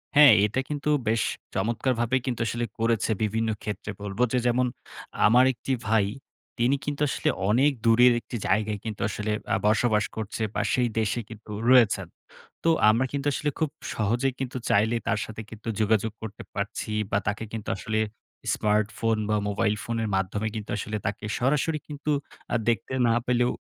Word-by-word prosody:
হ্যাঁ 145 Hz, -4 st, +9 dB
এটা 105 Hz, +5 st, -1 dB
কিন্তু 150 Hz, 0 st, -2 dB, 0.2 s
বেশ 110 Hz, 0 st, +2 dB, 0.3 s
চমৎকারভাবে 120 Hz, +1 st, 0 dB
কিন্তু 120 Hz, -4 st, -2 dB
আসলে 120 Hz, +1 st, -1 dB
করেছে 115 Hz, -1 st, +1 dB
বিভিন্ন 110 Hz, +1 st, 0 dB
ক্ষেত্রে 105 Hz, 0 st, -4 dB
বলবো, 100 Hz, +2 st, -4 dB
যে 125 Hz, -, +3 dB
যেমন 125 Hz, +1 st, +2 dB, 0.6 s
আমার 125 Hz, +4 st, +6 dB
একটি 130 Hz, -, -5 dB, 0.2 s
ভাই, 110 Hz, -2 st, +3 dB, 0.5 s
তিনি 125 Hz, +4 st, +3 dB
কিন্তু 145 Hz, 0 st, -3 dB
আসলে -, -, 0 dB, 0.2 s
অনেক 130 Hz, +7 st, +4 dB
দূরের 120 Hz, +2 st, +6 dB
একটি 120 Hz, -, -8 dB
জায়গায় 105 Hz, +1 st, +1 dB
কিন্তু 110 Hz, -2 st, -5 dB
আসলে 105 Hz, 0 st, -3 dB, 0.2 s
আ -, -, +4 dB
বসবাস 110 Hz, -1 st, +3 dB
করছে 110 Hz, +1 st, -4 dB
বা -, -, +1 dB
সেই 125 Hz, -1 st, +2 dB
দেশে 110 Hz, +2 st, 0 dB
কিন্তু 110 Hz, -1 st, -11 dB, 0.2 s
রয়েছেন। 110 Hz, -7 st, +5 dB, 0.6 s
তো 165 Hz, -, +3 dB, 0.2 s
আমরা 115 Hz, +4 st, +3 dB
কিন্তু 140 Hz, 0 st, -2 dB
আসলে 150 Hz, -, -1 dB
খুব 160 Hz, -2 st, +1 dB, 0.2 s
সহজে 115 Hz, +5 st, +1 dB
কিন্তু 130 Hz, -1 st, -3 dB
চাইলেই 110 Hz, +3 st, +3 dB
তার 105 Hz, -, +1 dB
সাথে 110 Hz, 0 st, -7 dB
কিন্তু 110 Hz, 0 st, -11 dB
যোগাযোগ 110 Hz, 0 st, +2 dB
করতে 110 Hz, -2 st, -7 dB
পারছি 105 Hz, +1 st, -3 dB, 0.2 s
বা 100 Hz, -, +3 dB
তাকে 105 Hz, +1 st, -1 dB
কিন্তু 110 Hz, -2 st, -5 dB
আসলে 110 Hz, +2 st, -2 dB, 0.5 s
স্মার্টফোন 110 Hz, +1 st, +1 dB
বা 105 Hz, -, +3 dB
মোবাইল 105 Hz, +1 st, +1 dB
ফোনের 115 Hz, -2 st, -2 dB
মাধ্যমে 95 Hz, +3 st, -1 dB
কিন্তু 105 Hz, -1 st, -5 dB
আসলে 105 Hz, +1 st, -3 dB
তাকে 105 Hz, +1 st, -3 dB
সরাসরি 150 Hz, +4 st, +1 dB
কিন্তু 150 Hz, 0 st, -3 dB, 0.4 s
আ -, -, +3 dB
দেখতে 115 Hz, +2 st, -1 dB
না 115 Hz, -, +4 dB
পেলেও, 125 Hz, 0 st, +2 dB
115 Hz, 165 wpm, -26 LUFS, 105-125 Hz, 0.6 s, হ্যাঁ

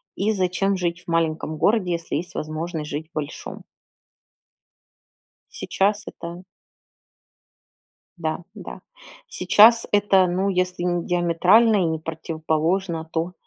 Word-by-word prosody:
и 205 Hz, +3 st, 0 dB
зачем 190 Hz, 0 st, 0 dB
жить 175 Hz, -1 st, -2 dB
в -, -, -36 dB
маленьком 160 Hz, -2 st, -1 dB
городе, 195 Hz, -1 st, +2 dB
если 170 Hz, 0 st, -4 dB
есть 175 Hz, +3 st, -7 dB
возможность 155 Hz, 0 st, -4 dB
жить 155 Hz, +3 st, -5 dB
большом. 150 Hz, -2 st, -6 dB, 1.9 s
Сейчас 205 Hz, +2 st, -1 dB
это 170 Hz, +1 st, -8 dB, 1.8 s
Да, 160 Hz, -2 st, -2 dB, 0.2 s
да, -, -, -9 dB, 0.5 s
сейчас 230 Hz, -, +5 dB
это, 200 Hz, -2 st, +4 dB
ну, 185 Hz, +3 st, 0 dB
если 180 Hz, -1 st, -1 dB
не 175 Hz, -1 st, -1 dB
диаметрально 180 Hz, +6 st, +4 dB
и 190 Hz, -, +2 dB
не 160 Hz, -1 st, -1 dB
противоположно, 160 Hz, +2 st, -2 dB
то, 165 Hz, +2 st, -2 dB
175 Hz, 110 wpm, -23 LUFS, 160-195 Hz, 1.9 s, сейчас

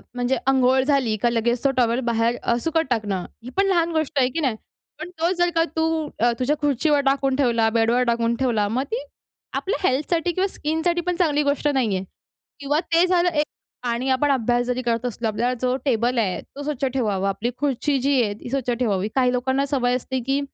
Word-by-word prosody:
म्हणजे 245 Hz, +1 st, 0 dB
अंघोळ 260 Hz, 0 st, +4 dB
झाली 265 Hz, -6 st, +1 dB
का 240 Hz, -, +3 dB
लगेच 235 Hz, +1 st, 0 dB
तो 275 Hz, -, +3 dB
टॉवेल 240 Hz, 0 st, +2 dB
बाहेर 230 Hz, +1 st, +1 dB
अ, 235 Hz, -, +2 dB
सुकत 325 Hz, 0 st, +1 dB
टाकणं. 205 Hz, -6 st, -1 dB, 0.2 s
ही 250 Hz, -, -7 dB
पण 390 Hz, -, +4 dB
लहान 340 Hz, -3 st, +2 dB
गोष्ट 315 Hz, -3 st, -1 dB
आहे 255 Hz, -1 st, +3 dB
की 320 Hz, -, -3 dB
नाही? 265 Hz, -8 st, 0 dB, 0.4 s
पण 335 Hz, +3 st, -6 dB
तो 335 Hz, +2 st, +2 dB
जर 350 Hz, 0 st, +3 dB
का 330 Hz, -, +4 dB
तू 320 Hz, -1 st, 0 dB
अ, 240 Hz, +1 st, +3 dB
तुझ्या 275 Hz, +4 st, +1 dB
खुर्चीवर 290 Hz, +1 st, +2 dB
टाकून 270 Hz, -1 st, +2 dB
ठेवला, 235 Hz, -5 st, +2 dB
बेडवर 230 Hz, +2 st, +2 dB
टाकून 235 Hz, 0 st, +1 dB
ठेवला, 235 Hz, -5 st, +1 dB
मग 245 Hz, +6 st, -1 dB
ती 480 Hz, +3 st, -2 dB, 0.5 s
आपल्या 390 Hz, -1 st, -1 dB
हेल्थसाठी 325 Hz, +6 st, 0 dB
किंवा 375 Hz, +3 st, 0 dB
स्किनसाठी 320 Hz, +3 st, -1 dB
पण 360 Hz, -, +1 dB
चांगली 300 Hz, -4 st, +2 dB
गोष्ट 285 Hz, +1 st, 0 dB
नाहीये 230 Hz, -10 st, +1 dB, 0.6 s
किंवा 290 Hz, +2 st, 0 dB
ते 335 Hz, +2 st, +5 dB
झालं 355 Hz, -1 st, +3 dB
एक 300 Hz, -3 st, 0 dB, 0.4 s
आणि 240 Hz, +3 st, -1 dB
आपण 270 Hz, +2 st, +2 dB
अभ्यास 245 Hz, -1 st, +1 dB
जरी 250 Hz, 0 st, -1 dB
करत 235 Hz, -1 st, -1 dB
असलो, 235 Hz, -1 st, -2 dB
आपल्याला 240 Hz, +4 st, 0 dB
जो 255 Hz, 0 st, +1 dB
टेबल 240 Hz, -1 st, +1 dB
आहे 200 Hz, -6 st, 0 dB
तो 285 Hz, -, -10 dB
स्वच्छ 285 Hz, -2 st, -2 dB
ठेवावा. 215 Hz, -7 st, 0 dB
आपली 200 Hz, +5 st, -2 dB
खुर्ची 285 Hz, 0 st, 0 dB
जी 275 Hz, -2 st, +3 dB
आहे 205 Hz, -3 st, 0 dB
ती -, -, -8 dB
स्वच्छ 260 Hz, -1 st, -2 dB
ठेवावी. 215 Hz, -5 st, 0 dB
काही 255 Hz, -2 st, +3 dB
लोकांना 260 Hz, +3 st, 0 dB
सवय 250 Hz, -3 st, +1 dB
असते, 260 Hz, +1 st, -3 dB
की 270 Hz, +3 st, 0 dB
260 Hz, 205 wpm, -23 LUFS, 235-295 Hz, 0.6 s, ते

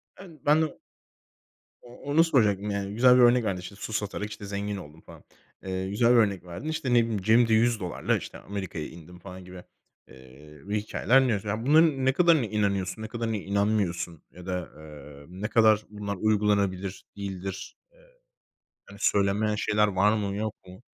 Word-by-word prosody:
Evet. 175 Hz, -5 st, -14 dB
Ben 150 Hz, +2 st, +4 dB
de 155 Hz, -2 st, -2 dB, 1.0 s
o 120 Hz, 0 st, -15 dB
onu 145 Hz, +4 st, +3 dB
soracaktım, 105 Hz, -, +1 dB
yani, 100 Hz, 0 st, -3 dB
güzel 125 Hz, +3 st, +5 dB
bir 125 Hz, -, +5 dB
örnek 120 Hz, 0 st, +5 dB
verdin, 95 Hz, -4 st, -2 dB
işte, 95 Hz, +3 st, -10 dB
"Su 110 Hz, +2 st, -7 dB
satarak, 105 Hz, 0 st, -3 dB
işte, 105 Hz, -1 st, -9 dB
zengin 100 Hz, +1 st, -4 dB
oldum." 80 Hz, -3 st, -12 dB
falan. -, -, -15 dB, 0.4 s
Eee, 95 Hz, 0 st, -3 dB
güzel 115 Hz, +4 st, +2 dB
bir -, -, +5 dB
örnek 100 Hz, -5 st, +2 dB
verdin. 90 Hz, -, -7 dB
İşte, 160 Hz, -6 st, -2 dB
ne -, -, +5 dB
bileyim, 110 Hz, -3 st, -3 dB
"Cebimde 115 Hz, +3 st, +4 dB
$100'la, 110 Hz, -5 st, +1 dB
işte, -, -, -9 dB
Amerika'ya 95 Hz, -6 st, -6 dB
indim." 85 Hz, +2 st, -13 dB
falan 95 Hz, -1 st, -11 dB
gibi, 90 Hz, -1 st, -11 dB, 0.4 s
eee, 70 Hz, +3 st, -16 dB
hikâyeler 105 Hz, +5 st, +2 dB
dinliyorsun. 110 Hz, -1 st, -2 dB
Bunların 150 Hz, -2 st, +4 dB
ne 130 Hz, -, +3 dB
kadarına 165 Hz, -4 st, +4 dB
inanıyorsun, 100 Hz, -1 st, -1 dB
ne 110 Hz, -, -5 dB
kadarına 115 Hz, 0 st, -3 dB
inanmıyorsun 100 Hz, -5 st, -1 dB
ya 90 Hz, 0 st, -13 dB
da, 90 Hz, -2 st, -4 dB
eee, 75 Hz, -2 st, -12 dB
ne 95 Hz, +4 st, -5 dB
kadar 110 Hz, -2 st, +3 dB
bunlar 105 Hz, -1 st, -5 dB
uygulanabilir 100 Hz, -2 st, 0 dB
değildir? 95 Hz, -1 st, -6 dB
Eee, -, -, -26 dB, 0.9 s
hani, 100 Hz, 0 st, -14 dB
söylenmeyen 105 Hz, +2 st, +1 dB
şeyler 105 Hz, 0 st, +1 dB
var 100 Hz, +2 st, +2 dB
mı 100 Hz, -2 st, -3 dB
yok 110 Hz, 0 st, -3 dB
mu? 90 Hz, +5 st, -13 dB
105 Hz, 170 wpm, -27 LUFS, 95-115 Hz, 1.0 s, güzel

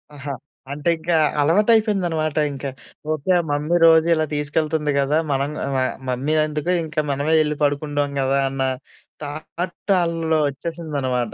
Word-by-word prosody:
ఆహా! 140 Hz, 0 st, -5 dB, 0.4 s
అంటే 150 Hz, +4 st, -1 dB
ఇంకా 165 Hz, +1 st, -1 dB, 0.3 s
అలవాటయిపోయిందనమాట 185 Hz, -3 st, +2 dB, 0.2 s
ఇంక. 135 Hz, 0 st, -8 dB, 0.5 s
ఓకే. 155 Hz, +5 st, -2 dB
ఆహ్, 170 Hz, -, 0 dB
మమ్మీ 150 Hz, +4 st, +1 dB
రోజిలా 160 Hz, -1 st, +5 dB
తీసుకెళ్తుంది 150 Hz, +1 st, 0 dB
గదా! 140 Hz, +3 st, +2 dB
మనం 140 Hz, +1 st, 0 dB
గ -, -, -4 dB, 0.2 s
ఆహ్, 130 Hz, -, -1 dB
మమ్మీ 135 Hz, +5 st, -1 dB
ఎందుకు 150 Hz, +3 st, -2 dB
ఇంక 155 Hz, -, -9 dB, 0.2 s
మనమే 145 Hz, +3 st, 0 dB
యెళ్లి 150 Hz, -1 st, 0 dB
పడుకుంటాం 145 Hz, 0 st, 0 dB
గదా! 135 Hz, +1 st, +1 dB
అన్న 135 Hz, 0 st, -4 dB, 0.6 s
థాట్‌ 170 Hz, +6 st, -5 dB
ఆళ్ళలో 165 Hz, -2 st, 0 dB
ఒచ్చేసిందనమాట. 140 Hz, -6 st, -3 dB
150 Hz, 130 wpm, -21 LUFS, 140-165 Hz, 0.6 s, రోజిలా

